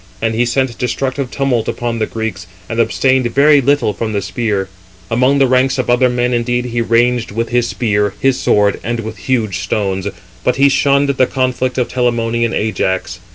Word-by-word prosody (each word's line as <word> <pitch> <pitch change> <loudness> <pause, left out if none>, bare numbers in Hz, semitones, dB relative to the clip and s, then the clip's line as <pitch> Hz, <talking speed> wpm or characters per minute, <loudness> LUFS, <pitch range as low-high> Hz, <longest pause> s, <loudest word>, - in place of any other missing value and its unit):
And 115 +1 -1
he 120 +2 +1
sent 130 -1 0
destructive 130 +2 -2
tumult 130 -5 -1
upon 120 -1 -3
the 110 - 0
Greeks, 110 -5 -5 0.2
and 115 - -4
abstained 130 +2 +2
very 145 +1 +5
little 140 -4 +1
from 110 0 -4
the 100 - -1
spear. 105 -5 -2 0.4
Among 130 +4 +3
the 135 - +4
ranks 130 +1 +2
of 125 -2 0
other 125 +1 +3
men 125 0 0
indeed 120 +1 0
he 120 -1 -2
ranged 120 +1 +1
with 115 +3 -3
his 120 -1 +1
spear, 105 -4 0
his 135 -1 +1
sword, 105 -1 +2
and 120 0 -2
with 110 0 -7
huge 110 -4 -1
stones; 95 0 -2 0.4
but 125 - +1
he 140 +1 +4
shunned 140 +1 +2
the 130 -2 +2
conflict 130 0 -1
of 125 - +1
Telamonian 115 -2 0
Ajax. 95 -4 -2
120 Hz, 185 wpm, -16 LUFS, 110-130 Hz, 0.4 s, very